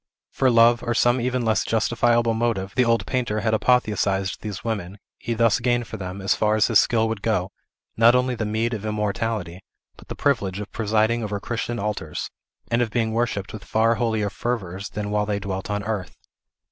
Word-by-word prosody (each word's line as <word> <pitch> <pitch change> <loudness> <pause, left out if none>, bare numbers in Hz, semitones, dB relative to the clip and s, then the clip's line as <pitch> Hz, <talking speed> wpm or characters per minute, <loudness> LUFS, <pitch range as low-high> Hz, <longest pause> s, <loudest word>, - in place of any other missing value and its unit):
For 130 - +2
love, 120 0 +5
or 120 -1 -2
some 120 +1 +3
even 125 0 -1
less 110 -1 +2
justifiable 115 +1 +2
motive, 110 -4 -1
the 125 - +4
old 115 0 +2
painter 120 -5 -1
had 110 0 0
apotheosized 105 -5 +1
these 105 -3 -6
women; 100 -4 -4 0.2
he 115 - -3
thus 115 -2 +3
gained 120 0 +1
for 110 - -7
them, 95 0 -6
as 95 - +3
far 105 0 +1
as 110 - +4
his 115 -3 +5
skill 115 -1 +2
would 110 -2 -3
go, 100 -4 0 0.4
not 115 +2 +6
only 125 0 +2
the 115 - -3
meed 110 +2 -1
of 110 -2 -4
immortality, 105 -3 -2 0.4
but - - -16
the - - -6
privilege 100 -9 0
of 105 - -7
presiding 110 +1 +1
over 105 -1 -3
Christian 120 +2 -3
altars, 100 -8 -4 0.4
and 115 +1 +2
of 120 - 0
being 110 0 0
worshipped 115 -3 -2
with 110 - -8
far 115 +1 +2
holier 110 -3 -1
fervors 100 -5 -4
than 105 -1 -4
while 105 0 0
they 105 -1 0
dwelt 95 -1 -4
on 105 0 -2
earth. 105 -5 -4
110 Hz, 195 wpm, -23 LUFS, 105-120 Hz, 0.4 s, not